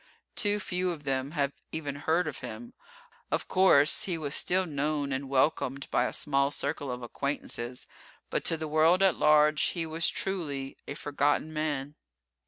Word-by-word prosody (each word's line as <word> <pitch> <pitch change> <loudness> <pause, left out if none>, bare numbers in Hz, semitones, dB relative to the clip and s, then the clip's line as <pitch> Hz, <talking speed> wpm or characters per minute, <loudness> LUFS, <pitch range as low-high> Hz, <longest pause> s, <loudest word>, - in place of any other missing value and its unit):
Too 205 -2 +1
few 180 -2 -1
of 160 -4 -5
them 135 +1 -2
have 140 -1 +1 0.2
even 145 -3 -4
heard 160 +3 +1
of 150 - -5
him. 115 +2 -8 0.6
Of - - -1
course, 170 -6 +4
he 180 -3 -2
was 150 -2 -4
still 185 +1 +2
known 145 -2 -1
and 135 0 -3
welcomed 135 0 +1
by 125 - +3
a - - -2
small 140 0 +1
circle 145 0 -2
of 125 0 -5
acquaintances, 125 -1 -4 0.5
but - - 0
to 165 - +3
the 160 0 -4
world 160 +5 +4
at 190 -4 +5
large 150 0 +4
he 170 -2 0
was 160 +1 +1
truly 145 -8 -3
a 140 - -5
"forgotten 145 +2 0
man." 145 -2 -2
150 Hz, 170 wpm, -29 LUFS, 140-160 Hz, 0.6 s, at